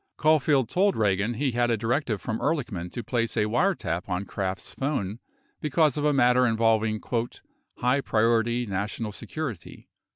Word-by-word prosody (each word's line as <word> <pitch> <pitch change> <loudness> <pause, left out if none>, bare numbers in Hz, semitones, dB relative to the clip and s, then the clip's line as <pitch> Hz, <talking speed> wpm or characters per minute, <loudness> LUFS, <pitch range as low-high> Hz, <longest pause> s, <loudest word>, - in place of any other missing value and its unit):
Caulfield 150 -4 +3
told 195 - +2
Ragan 105 +2 +1
he 135 +2 0
had 120 0 +1
a 115 - +2
directive 115 0 -1
from 110 +3 -3
Ehrlichman 115 - -2
to 120 - -4
place 115 +1 -1
a 105 - +3
wiretap 105 - 0
on 90 +2 -2
Kraft's 95 -2 -4
phone 120 -7 -2 0.4
because 150 -1 +2
of 150 - -1
a 150 - +4
matter 125 -2 +4
involving 110 -1 +2 0.8
"high 125 +3 +2
priority 115 +1 +1
national 105 +2 -3
security." 125 - -7
115 Hz, 150 wpm, -26 LUFS, 105-135 Hz, 0.8 s, a